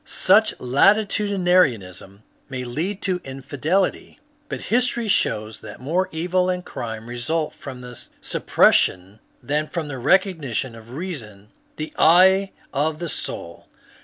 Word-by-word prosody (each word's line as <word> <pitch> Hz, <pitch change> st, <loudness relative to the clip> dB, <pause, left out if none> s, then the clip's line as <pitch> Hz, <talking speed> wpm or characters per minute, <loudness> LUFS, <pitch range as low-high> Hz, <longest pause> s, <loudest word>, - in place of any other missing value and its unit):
Such -, -, +3 dB
latitudinarianism 175 Hz, -, +2 dB, 0.3 s
may 130 Hz, -2 st, -4 dB
lead 165 Hz, +11 st, -3 dB
to 185 Hz, -2 st, 0 dB
infidelity, 145 Hz, -, -2 dB, 0.3 s
but -, -, -4 dB
history 240 Hz, -2 st, +1 dB
shows 110 Hz, -, 0 dB
that 105 Hz, -1 st, -10 dB
more 175 Hz, +8 st, -1 dB
evil 180 Hz, +3 st, 0 dB
and 180 Hz, 0 st, -2 dB
crime 110 Hz, -1 st, -6 dB
result 135 Hz, +7 st, -2 dB
from 130 Hz, -3 st, -9 dB
the 125 Hz, -1 st, -10 dB, 0.2 s
sup -, -, -5 dB
pression 95 Hz, +4 st, +3 dB, 0.2 s
than 150 Hz, +2 st, -1 dB
from 160 Hz, -3 st, -4 dB
the 135 Hz, -3 st, -5 dB
recognition 145 Hz, -, +1 dB
of 115 Hz, +2 st, -12 dB
reason, 115 Hz, -, -7 dB, 0.3 s
the 155 Hz, 0 st, -6 dB
eye 190 Hz, +4 st, +6 dB, 0.2 s
of 155 Hz, +2 st, 0 dB
the 170 Hz, 0 st, -4 dB
soul. 85 Hz, -, -5 dB
150 Hz, 130 wpm, -22 LUFS, 120-185 Hz, 0.3 s, eye